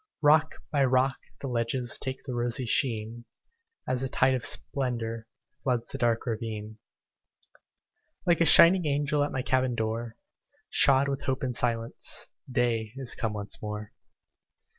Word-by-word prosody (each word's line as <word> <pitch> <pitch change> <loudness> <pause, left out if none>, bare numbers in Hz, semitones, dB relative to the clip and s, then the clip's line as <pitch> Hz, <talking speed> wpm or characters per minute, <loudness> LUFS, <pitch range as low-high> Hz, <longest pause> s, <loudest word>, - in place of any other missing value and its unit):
Rock 155 +2 +4 0.2
by 145 -3 +2
rock 130 0 +2 0.2
the 140 - -4
ledges 120 0 -1
Take 130 0 -5
the 130 - -5
rosy 120 +1 -2
sheen, 115 -1 -1 0.6
As 130 -1 0
the 135 - -2
tide 130 +1 +3
of 125 -2 -2
splendor 120 -5 -1 0.3
Floods 125 -3 -1
the 135 - -6
dark 120 -2 +1
ravine. 110 -2 -5 1.5
Like 170 -1 +3
a - - +5
shining 170 +2 +7
angel 145 0 +1
At 145 - -2
my 130 - -2
cabin 130 -1 +1
door, 115 +1 -3 0.6
Shod 140 0 +5
with 140 0 -2
hope 135 +1 -1
and 125 -2 -2
silence, 115 -1 -1 0.3
Day 115 -3 0
is 135 -3 -1
come 110 -2 -2
once 105 -1 -4
more. 105 0 -6
125 Hz, 145 wpm, -28 LUFS, 115-135 Hz, 1.5 s, shining